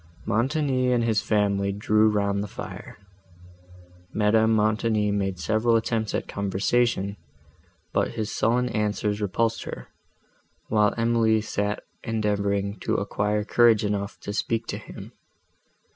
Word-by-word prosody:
Montoni 130 +3 +1
and 120 -1 +2
his 110 -2 +1
family 100 -2 +1
drew 105 +2 +3
round 100 -1 0
the 105 - -4
fire. - - -9 1.1
Madame 110 +1 +3
Montoni 110 -1 +2
made 95 -2 -1
several 110 +6 +2
attempts 110 -1 0
at - - -3
conversation, 100 +1 0 0.8
but - - 0
his 110 -1 -3
sullen 125 +3 +2
answers 105 -1 -1
repulsed 115 +3 0
her, - - -8 0.8
while 105 -1 +3
Emily 115 -1 +3
sat 105 -1 -2 0.2
endeavouring 100 -2 -1
to - - -1
acquire 105 +1 -1
courage 115 -1 +4
enough 100 -1 -3
to 100 - -5
speak 115 +2 -1
to - - -3
him. - - -10
105 Hz, 125 wpm, -25 LUFS, 100-115 Hz, 1.1 s, courage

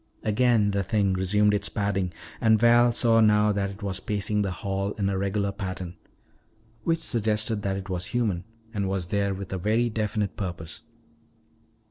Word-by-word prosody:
Again 110 -1 +3
the 100 0 0
thing 100 0 +1
resumed 105 +3 +2
its 105 - -1
padding 100 -3 -1 0.3
and 110 -1 +5
Val 120 +1 +5
saw 115 -1 +3
now 105 -1 +4
that 100 -1 -1
it 100 +2 -10
was 95 -2 -3
pacing 105 +1 -1
the 100 - 0
hall 100 +2 -3
in 100 -2 -1
a 100 - -1
regular 100 +1 0
pattern. 95 -3 -5 0.9
Which 165 0 +2
suggested 110 -6 0
that 95 -1 -1
it 95 -1 -7
was 90 -1 -3
human 105 -6 -1 0.3
and 100 -3 -1
was 95 -3 -3
there 100 -1 0
with 95 0 -6
a 95 - -2
very 115 +5 +1
definite 105 -2 -1
purpose. 85 -5 -6
100 Hz, 170 wpm, -26 LUFS, 95-110 Hz, 0.9 s, and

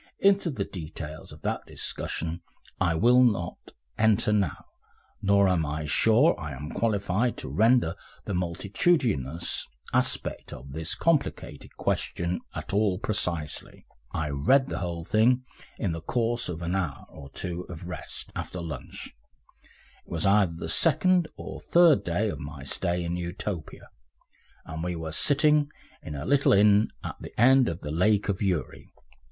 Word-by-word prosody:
Into 195 -2 +3
the 110 -10 -2
details 80 -3 -8
of - - -13
that - - -1
discussion 85 +1 -3 0.4
I 85 -3 +2
will 120 +8 +5
not 100 -8 +1 0.4
enter 110 0 +3
now, 100 -7 0 0.6
nor 100 0 +4
am 90 -3 +2
I 75 0 -3
sure 115 - +4
I 75 -4 -5
am 75 +4 -7
qualified 105 +1 0
to - - -6
render 115 -6 +3 0.3
the 100 - -3
multitudinous 90 - 0 0.3
aspect - - -1
of 65 +2 -10
this 80 +2 -2
complicated 165 -4 -1
question 85 +1 -1 0.2
at - - -5
all 100 -2 +2
precisely. 85 -7 -3 0.3
I 75 -1 -2
read 130 - +3
the - - -3
whole 85 -2 -4
thing 125 +6 +3 0.3
in 100 - -1
the 80 0 -4
course 120 +5 -1
of 85 -1 -5
an 85 +1 -1
hour 85 -8 -2
or 70 - -12
two 90 +4 -4
of 85 -1 -8
rest 90 - -6
after 90 - -5
lunch 75 -7 -7 0.9
it - - -24
was 80 -1 -1
either 100 -4 +4
the 80 - -5
second 170 - +4
or - - -8
third 170 - +5
day 90 +5 0
of - - -4
my 75 -2 -8
stay 85 +5 -1
in 85 +1 -2
Utopia 85 -1 -5 0.8
and 80 0 -5
we 90 0 -2
were 80 -1 -5
sitting 145 - +4 0.3
in 75 - -7
a 70 - -5
little 140 0 +4
inn 105 +1 +5 0.2
at - - -5
the - - -9
end 130 +2 +6
of 85 +2 -5
the 75 - -5
Lake 105 +6 +2
of 95 - -1
Uri. 95 -6 -2
90 Hz, 155 wpm, -27 LUFS, 80-115 Hz, 0.9 s, end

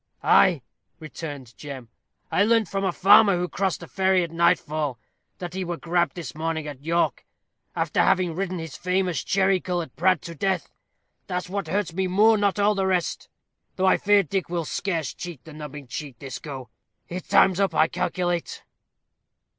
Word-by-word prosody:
"Ay," 165 -9 +5 0.4
returned 145 -6 -8
Jem. 135 -5 -8 0.4
"I 200 - +3
learnt 225 -1 +3
from 195 +3 -2
a 190 - +1
farmer 200 +1 +6
who 180 0 -1
crossed 190 -1 -1
the 170 - -9
ferry 190 -1 +2
at 170 - -5
nightfall, 155 -5 +1 0.4
that 175 -2 -6
he 190 0 -3
were 175 -1 -4
grabb'd 175 -3 0
this 170 -7 -6
morning 160 0 -3
at 140 -3 -8
York, 170 +2 0 0.5
after - - +1
having 180 -3 +2
ridden 185 +1 -3
his 165 -1 -7
famous 180 -5 -1
cherry 195 -1 +2
colored 175 -6 -4
prad 185 -1 +2
to 170 - -7
death 190 +3 -1 0.6
that's 180 -1 -3
what 195 -2 -3
hurts 185 0 -1
me 190 +2 0
more 210 +5 +5
not 205 -1 +1
all 205 +1 +3
the 195 -2 0
rest; 180 -2 -1 0.5
though 190 - 0
I 190 - +5
fear 205 -1 +4
Dick 185 +2 -2
will 170 -2 -2
scarce 165 -6 -2
cheat 170 -8 -8
the 160 - -11
nubbing 150 -2 -8
cheat 130 0 -7
this 135 +1 -7
go. 135 -6 -8 0.4
His 180 +2 -5
time's 190 -1 +4
up, 195 -1 +1
I 155 - +5
calculate." 175 0 -2
175 Hz, 180 wpm, -25 LUFS, 160-190 Hz, 0.6 s, farmer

